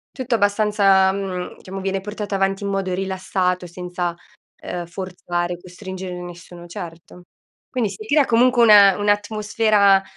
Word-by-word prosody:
Tutto 255 -3 -1
abbastanza, 205 -2 +3
mhmm, 190 -2 -4
diciamo, 195 +1 -8
viene 195 0 -2
portato 210 0 -5
avanti 195 +1 0
in 200 - -2
modo 195 -2 -1
rilassato, 185 -1 -1
senza, 175 0 -4 0.4
ehm, 175 -1 -5
forzare, 175 -1 -4
costringere 185 +1 -8
nessuno, 175 0 -10
certo. 175 -1 -10 0.5
Quindi, 245 -5 -1
si 205 +3 -9
crea 290 +4 +3
comunque 245 +1 +3
una 205 -4 +7
un'atmosfera 205 -1 +2
195 Hz, 130 wpm, -21 LUFS, 180-210 Hz, 0.5 s, una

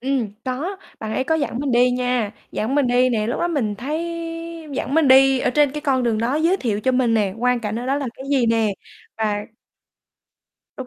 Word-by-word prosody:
Ừm, 260 -4 -1
có, 290 +10 -3 0.2
bạn 220 -1 -4
ấy 260 - 0
có 320 - +1
dẫn 285 -6 -1
mình 280 -2 -1
đi 245 +1 +4
nha, 250 -4 0 0.2
dẫn 225 +6 -1
mình 285 -2 +3
đi 245 +1 +3
nè. 220 -4 0
Lúc 235 - -2
đó 345 - +1
mình 255 -11 -1
thấy 285 +9 -3 0.7
dẫn 270 +1 -3
mình 320 -3 +4
đi 265 0 +6
ở - - +1
trên 295 +1 +3
cái 300 - -4
con 270 -4 +1
đường 230 -3 +1
đó, 235 +4 0
giới 330 +5 +2
thiệu 220 - -2
cho 260 +4 +1
mình 250 -3 +2
nè, 205 -4 +1
quang 250 0 +2
cảnh 220 0 -3
ở 245 - -5
đó 270 - +1
là 280 -2 -2
cái 265 - -9
gì 265 -4 +2
nè. 225 -1 +2 0.5
Và 210 -2 -1 1.3
Đúng 260 - -6
250 Hz, 225 wpm, -21 LUFS, 230-275 Hz, 1.3 s, đi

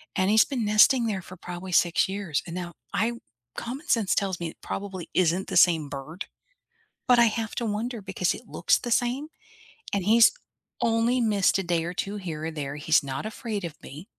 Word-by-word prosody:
and 185 +1 +2
he's 215 +1 +6
been 250 -6 -3
nesting 230 +4 +5
there 200 -4 -2
for 185 +1 -12
probably 180 +2 -7
6 175 +2 +3
years, 190 -7 -2
and, 170 - -6
now, 175 -2 -5 0.2
I 220 +3 +2
w 235 - -7 0.4
common 270 +9 -6
sense 225 -6 +2
tells 190 -3 -1
me 170 -1 -3
it - - -14
probably 190 -4 -6
isn't 180 +1 +1
the - - -4
same 165 -4 +5
bird, 145 +6 -7 0.8
but 245 -1 +6
I 235 - +7
have 225 -1 -1
to 235 - -2
wonder 220 +2 -3
because 190 -2 -1
it 230 - -11
looks - - +2
the 240 - -5
same, 250 +6 +1 0.7
and 195 -3 0
he's 225 +2 +6 0.5
only 230 +2 +2
missed 210 -5 +2
a 195 - -1
day 170 -1 0
or 175 +2 -4
2 200 +3 -3
here 160 -5 -5
or 165 - -3
there, 145 -2 -5
he's 150 0 +3
not 135 +5 -4
afraid 215 -2 -4
of 165 - -7
me. 150 +6 -10
195 Hz, 205 wpm, -26 LUFS, 175-225 Hz, 0.8 s, I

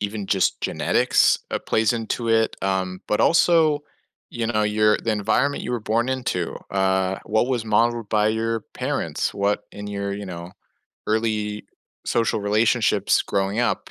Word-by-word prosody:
even 105 0 -4
just 95 -1 +1
genetics, - - +2
uh, - - -1
plays 110 0 +1
into 115 0 -3
it, 115 0 +2
um, 95 -1 -1
but 105 - +1
also, 160 -3 +4 0.5
you 115 -2 -3
know, 110 -2 0
your 105 0 +3
the 115 - -2
environment 125 +7 0
you - - -3
were 120 - -1
born 115 +4 0
into, 125 -10 -2
uh, 95 -1 +1
what 110 +3 +1
was 120 -4 -1
modeled 115 0 +1
by 105 0 +2
your 115 +1 -1
parents? - - -2
What 100 +1 0
in 105 0 -8
your, 100 -1 -3
you 100 0 -6
know, 85 -1 -8 0.5
early 110 -1 -1 0.4
social 115 -2 0
relationships 105 0 +2
growing 100 +3 -1
up, 120 - -1
110 Hz, 155 wpm, -23 LUFS, 100-115 Hz, 0.5 s, also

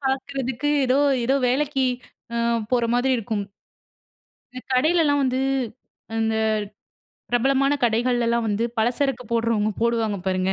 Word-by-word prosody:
பாக்கறதுக்கு 265 0 -2 0.2
ஏதோ, 260 +2 +2 0.3
ஏதோ 265 +3 +2
வேலைக்கு 270 0 +1 0.5
அ - - -1 0.3
போற 245 -2 +2
மாரி 245 +2 +2
இருக்கும். 215 -2 -2 1.1
இந்த 255 - -7
கடையிலலாம் 295 +1 +3
வந்து 260 0 0 0.8
இந்த 225 0 +1 1.0
பிரபலமான 270 +3 +2
கடைகள்லாம் 235 0 +1
வந்து 215 +2 0
பலசரக்கு 250 +3 0
போடுறவங்க, 230 -2 +1
போடுவாங்க 225 -3 +1
பாருங்க. 185 0 0
245 Hz, 110 wpm, -23 LUFS, 230-270 Hz, 1.1 s, கடையிலலாம்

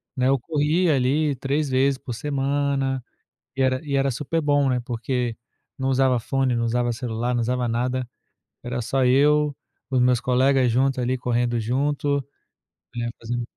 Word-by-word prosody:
né, 130 -1 +1
eu 135 +1 +4
corria 155 +4 +1
ali 140 +3 +1
3 140 +3 -1
vezes 135 +1 +2
por 125 - -7
semana 135 0 -1 0.5
e 135 - +1
era 130 0 +2
e 140 -2 -3
era 135 0 +2
super 150 +6 -2
bom, 145 -2 +2
né, 125 -1 +1
porque 120 0 -2 0.4
não 130 0 -1
usava 130 -1 +3
fone, 135 +1 0
não 115 - 0
usava 120 +1 0
celular, 120 +1 -2
não 120 - +1
usava 125 +1 0
nada, 125 +2 -1 0.6
era 120 0 -4
só 130 +3 0
eu, 145 +3 +3 0.3
os 130 -2 +1
meus 125 -1 +3
colegas 130 0 +3
juntos 130 +2 +1
ali 125 +1 0
correndo 120 -1 0
junto, 140 +4 0 0.7
né, 120 0 -2
fazendo 120 +1 -3
130 Hz, 165 wpm, -23 LUFS, 125-140 Hz, 0.7 s, eu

